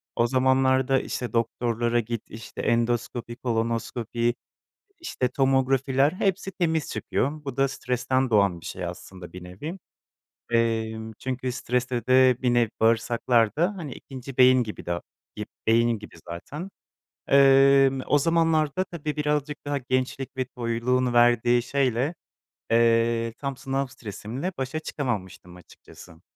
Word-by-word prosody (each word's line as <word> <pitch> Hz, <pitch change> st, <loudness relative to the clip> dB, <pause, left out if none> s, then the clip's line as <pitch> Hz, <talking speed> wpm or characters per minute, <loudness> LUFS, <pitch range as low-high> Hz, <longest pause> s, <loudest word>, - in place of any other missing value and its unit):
O 120 Hz, -, +2 dB
zamanlarda, 130 Hz, +1 st, +3 dB
işte, 125 Hz, -, -5 dB
doktorlara 120 Hz, 0 st, 0 dB
git, 115 Hz, 0 st, -3 dB
işte, 115 Hz, +1 st, -8 dB
endoskopi, 120 Hz, 0 st, -1 dB
kolonoskopi, 115 Hz, 0 st, -1 dB, 0.7 s
işte, 130 Hz, -, -2 dB
tomografiler 135 Hz, +1 st, +2 dB
hepsi 195 Hz, 0 st, -1 dB
temiz 160 Hz, -4 st, -1 dB
çıkıyor. 150 Hz, +3 st, -2 dB
Bu 135 Hz, -2 st, -5 dB
da 135 Hz, 0 st, +3 dB
stresten 130 Hz, 0 st, -1 dB
doğan 100 Hz, -5 st, +3 dB
bir -, -, -17 dB
şey -, -, -5 dB
aslında 90 Hz, -2 st, -9 dB
bir 90 Hz, -1 st, -9 dB
nevi. 145 Hz, -, -7 dB, 0.7 s
Emm, 110 Hz, -1 st, 0 dB
çünkü 130 Hz, -1 st, -3 dB
stresle 125 Hz, -1 st, -2 dB
de 130 Hz, -1 st, +5 dB
bir 125 Hz, -2 st, +2 dB
nevi 120 Hz, -2 st, +3 dB
bağırsaklar 115 Hz, 0 st, +2 dB
da, 175 Hz, +7 st, +1 dB
hani, 155 Hz, -6 st, -6 dB
ikinci 135 Hz, -1 st, -10 dB
beyin 130 Hz, -1 st, +6 dB
gibi 105 Hz, -, -8 dB
de, 85 Hz, 0 st, -2 dB, 0.3 s
gib -, -, -5 dB, 0.2 s
beyin 115 Hz, -1 st, +3 dB
gibi 105 Hz, -, -12 dB
zaten. 145 Hz, -, -7 dB, 0.6 s
Emm, 135 Hz, -1 st, +6 dB
o 145 Hz, -, +3 dB
zamanlarda, 165 Hz, +2 st, +2 dB
tabii, 155 Hz, -5 st, -5 dB
birazcık 150 Hz, 0 st, -1 dB
daha 145 Hz, 0 st, 0 dB
gençlik 130 Hz, +1 st, -2 dB
ve 130 Hz, -, 0 dB
toyluğun 125 Hz, 0 st, -1 dB
verdiği 120 Hz, 0 st, +4 dB
şeyle, 135 Hz, +3 st, 0 dB, 0.6 s
eee, 115 Hz, 0 st, +3 dB
tam 140 Hz, -2 st, -4 dB
sınav 135 Hz, 0 st, -2 dB
stresimle 120 Hz, -, -6 dB
başa 135 Hz, +4 st, -3 dB
çıkamamıştım 105 Hz, -, -5 dB
açıkçası. 90 Hz, -1 st, -16 dB
125 Hz, 130 wpm, -25 LUFS, 115-135 Hz, 0.7 s, beyin